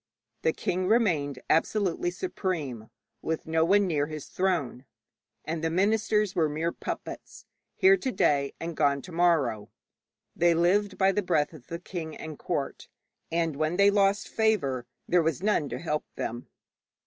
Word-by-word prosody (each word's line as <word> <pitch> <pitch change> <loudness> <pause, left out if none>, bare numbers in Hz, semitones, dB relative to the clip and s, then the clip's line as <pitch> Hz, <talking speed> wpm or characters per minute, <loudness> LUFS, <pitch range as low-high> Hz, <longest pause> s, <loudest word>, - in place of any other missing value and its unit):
The 160 - +2
king 185 +3 -2
remained 170 - +2
absolutely 175 +1 +1
supreme, 170 - -4 0.3
with 160 0 -3
no 160 0 +2
one 200 +4 +4
near 150 -5 0
his 155 -2 -7
throne, 165 -9 -1 0.6
and 160 0 -3
the 165 - +1
ministers 210 +2 +2
were 160 -4 +2
mere 160 +3 -1
puppets, - - -7 0.3
here 385 +1 +6
to 265 -8 -2
day 140 - +1
and 165 0 -5
gone 140 -2 +2
to 180 - -10
morrow. 165 -11 +1 0.7
They 170 0 +3
lived 190 +4 +2
by 190 0 +4
the 205 - 0
breath 165 -5 +1
of 145 -6 -14
the 170 - -4
king 165 -3 -6
and 155 -2 -8
court, - - -3 0.4
and 165 -2 0
when 155 +3 0
they 200 0 +6
lost 200 0 +2
favour 140 - 0 0.2
there 175 0 +4
was 160 +2 -1
none 190 -9 +1
to - - -4
help 150 -2 -2
them. 120 +2 -4
170 Hz, 160 wpm, -28 LUFS, 150-195 Hz, 0.7 s, here